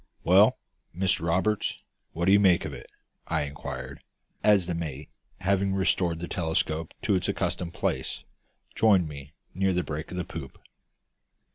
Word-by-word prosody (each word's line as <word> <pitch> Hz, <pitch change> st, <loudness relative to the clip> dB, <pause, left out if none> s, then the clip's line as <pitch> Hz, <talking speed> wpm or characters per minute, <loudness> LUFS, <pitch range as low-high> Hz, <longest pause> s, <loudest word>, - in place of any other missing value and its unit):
"Well, -, -, +6 dB, 0.4 s
Mr 90 Hz, -3 st, +1 dB
Roberts, 100 Hz, +5 st, 0 dB, 0.3 s
what 85 Hz, +2 st, -1 dB
do 95 Hz, -, +5 dB
you 100 Hz, -, +7 dB
make 95 Hz, -4 st, +4 dB
of 75 Hz, -, -5 dB
it?" -, -, -10 dB, 0.4 s
I -, -, 0 dB
inquired, 70 Hz, -2 st, -6 dB, 0.4 s
as 100 Hz, -4 st, +5 dB
the 90 Hz, -, -2 dB
mate, 75 Hz, -4 st, -5 dB, 0.3 s
having 100 Hz, +1 st, +1 dB
restored 90 Hz, -3 st, +1 dB
the 85 Hz, +1 st, -5 dB
telescope 80 Hz, -2 st, -1 dB
it -, -, -4 dB
its 95 Hz, -2 st, +1 dB
accustomed 85 Hz, -2 st, -2 dB
place, -, -, -2 dB, 0.5 s
joined 100 Hz, -4 st, +4 dB
me 70 Hz, 0 st, -10 dB, 0.2 s
near 95 Hz, +1 st, +1 dB
the 90 Hz, 0 st, +1 dB
break 75 Hz, +1 st, -5 dB
of 90 Hz, -, -6 dB
the 90 Hz, -, -2 dB
poop. 65 Hz, -, -8 dB
85 Hz, 155 wpm, -27 LUFS, 75-95 Hz, 0.5 s, you